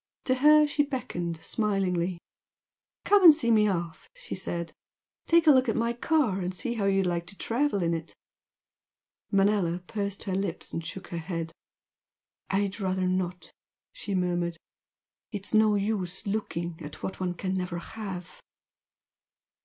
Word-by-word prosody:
To 255 - +3
her 300 +3 +6
she 290 0 +1
beckoned 250 - -3
smilingly. 190 -5 0 0.9
"Come 410 -1 +5
and 330 - +13
see 275 -6 +1
me 215 -1 +5
off!" 170 -4 -3
she - - -7
said 170 -3 -4 0.5
"Take 335 0 +5
a 305 - +8
look 260 -3 +4
at 225 - +1
my 235 +1 +1
car 240 -5 +1
and 180 +1 -3
see 235 +6 -2
how 215 -4 -1
you'd 195 -1 +2
like 170 -1 -1
to 195 +2 -9
travel 235 -5 0
in 170 0 +1
it!" 165 0 -5 1.2
Manella 195 -3 +2
pursed 200 0 -3
her 190 - -3
lips 190 -3 -3
and 165 - -3
shook 185 +3 -7
her 170 - -4
head. 165 -1 -4 1.0
"I'd 200 +1 0
rather 185 -1 0
not!" 180 -2 -2 0.4
she 200 -2 -4
murmured 175 -2 0 0.7
"It's 205 -1 -5
no 215 -1 +5
use 195 -3 -2
looking 175 -5 -3
at 150 - -9
what 190 - -4
one 180 -1 -2
can 185 +2 -3
never 180 -2 -2
have!" 185 -1 -7
195 Hz, 155 wpm, -28 LUFS, 175-220 Hz, 1.2 s, and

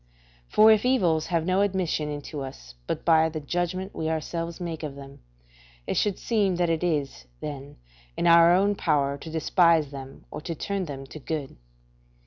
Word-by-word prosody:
For 215 +1 +7
if 215 -1 +4
evils 175 -12 +2
have 165 -2 0
no 185 +2 +2
admission 185 -6 0
into 145 0 -6
us - - -9
but - - -3
by 160 -1 +5
the 155 0 -5
judgment 175 +5 -3
we 160 - -2
ourselves 165 +2 -3
make 170 -3 -5
of 150 -3 -5
them, 140 0 -11 0.7
it - - -2
should 205 -3 +1
seem 205 -5 +1
that 175 -1 +1
it 165 +1 -1
is, 150 -6 -1
then, 145 -1 -7 0.4
in - - -1
our 170 0 +7
own 195 +3 +3
power 145 -7 +1
to 160 - -9
despise 160 -2 +3
them 135 -1 -10
or - - -6
to 165 +1 -5
turn 195 +3 -3
them 135 -3 -7
to 155 - -10
good. 150 -1 -4
165 Hz, 180 wpm, -26 LUFS, 145-180 Hz, 0.7 s, For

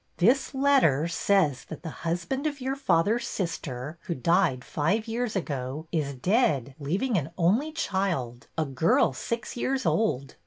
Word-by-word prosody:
'' - - -41
This 275 +1 -3
letter 265 - +4
says 170 -6 +2
that 160 0 -9
the 160 - -5
husband 175 - -1
of 290 -2 -4
your 265 +1 -2
father's 225 -1 +1
sister 155 -4 -4
(who 170 - -2
died 165 -3 +2
five 195 +10 0
years 230 0 -2
ago) 140 -4 -3
is 145 -4 -1
dead, 145 - +1
leaving 190 - 0
an 150 0 -5
only 215 - +2
child, 190 - -2
— - - -41
a 160 - +1
girl 135 +1 +2
six 230 - -4
years 260 +2 -1
old. 140 - 0
175 Hz, 160 wpm, -27 LUFS, 145-235 Hz, -, letter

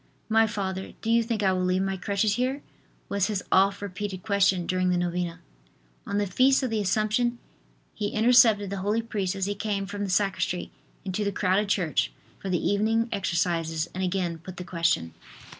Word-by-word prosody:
"My 225 0 +4
Father, 190 -2 -4
do 225 - 0
you 230 0 +5
think 225 -2 -2
I 190 -1 +3
will 185 0 0
leave 185 +1 +1
my 195 0 -1
crutches 200 +2 0
here?" 255 +5 -1 0.4
was 200 -1 0
his 205 -3 -2
oft 195 +1 +3
repeated 190 -1 -5
question 195 -4 +2
during 185 0 +1
the 180 - +2
novena. 175 -1 -2 0.7
On 200 - -1
the 205 - +1
feast 260 +8 +3
of 255 - -1
the 220 -1 0
assumption 215 +5 +1 0.6
he 210 - -2
intercepted 220 -2 +4
the 200 - -3
holy 210 +4 0
priest 200 -4 -2
as 195 -1 -1
he 205 - -1
came 200 -1 -2
from 205 +1 -5
the 200 - -3
sacristy 185 -2 0 0.3
into 190 +2 -2
the 200 - 0
crowded 200 +1 +1
church 160 - +1 0.3
for 195 - -5
the 180 -2 0
evening 225 +3 +1
exercises 170 -3 -1
and 190 - -3
again 180 -3 -1
put 180 +3 -10
the 180 - -5
question. 165 - 0
195 Hz, 190 wpm, -26 LUFS, 185-215 Hz, 0.7 s, you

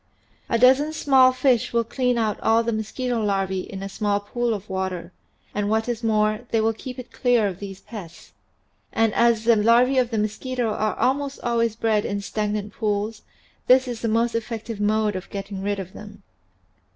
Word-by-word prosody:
A 230 - +2
dozen 265 +6 +4
small 265 -4 +5
fish 255 -2 +1
will 235 0 +2
clean 250 +1 0
out 215 -3 0
all 225 +1 +3
the 230 0 -1
mosquito 230 +2 -2
larvae 195 -2 0
in 190 +1 -7
a - - -3
small 205 0 -1
pool 240 +4 -2
of 205 0 -8
water, 190 -2 -4 0.4
and 205 0 -1
what 220 +1 +1
is 240 -1 -3
more, 215 +1 +1
they 225 - +1
will 225 +1 +2
keep 250 +3 -8
it 255 - -9
clear 245 -3 +2
of 190 -2 -3
these 195 -1 -8
pests. 185 -8 -10 0.6
And 225 -1 +2
as 235 -2 +3
the 230 0 +5
larvae 235 +5 +4
of 245 -2 +1
the 225 - -2
mosquito 230 +3 -2
are 215 0 -1
almost 275 +1 0
always 230 -2 0
bred 220 -2 +1
in 200 - -2
stagnant 210 0 -3
pools, 210 0 -2 0.5
this 255 +1 +5
is 240 -2 -5
the 230 - -1
most 230 +2 +1
effective 230 -1 -4
mode 210 0 +1
of 185 - -6
getting 195 -1 -6
rid 205 +1 -1
of 190 -1 -7
them. 210 0 -12
220 Hz, 190 wpm, -23 LUFS, 205-240 Hz, 0.6 s, small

